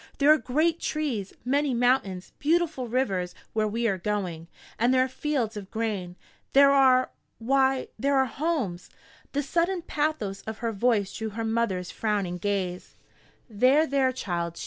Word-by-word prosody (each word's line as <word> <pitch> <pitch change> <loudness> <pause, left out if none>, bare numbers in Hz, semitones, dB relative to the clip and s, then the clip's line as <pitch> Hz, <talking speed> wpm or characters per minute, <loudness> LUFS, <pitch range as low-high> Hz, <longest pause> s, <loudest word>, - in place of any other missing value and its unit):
There 295 +2 +6
are - - +3
great 320 +6 +1
trees, 260 -11 -2
many 275 0 +1
mountains, 235 -7 +1
beautiful 315 -4 +1
rivers 195 -8 -1 0.2
where 215 -1 +1
we 230 +2 -1
are 195 -3 -1
going, 180 -5 -3 0.3
and 240 +3 +3
there 255 0 +4
are - - -1
fields 260 -4 -2
of 200 -2 -7
grain. 205 -6 -3 0.4
There 275 0 +7
are 260 -2 +4 0.3
why, 265 +2 +1
there 280 +3 +2
are 265 - +4
homes!" 260 - -2 0.4
The 285 +1 0
sudden 340 +5 0
pathos 290 - -2
of 220 0 -4
her 230 0 -2
voice 210 -2 +1
drew 220 -1 -3
her 225 +2 -4
mother's 220 -5 -1
frowning 200 -5 -2
gaze. 185 -2 -3 0.5
"There, 255 +7 +4
there, 270 -2 +2
child!" 170 -8 -3
235 Hz, 155 wpm, -26 LUFS, 200-275 Hz, 0.5 s, There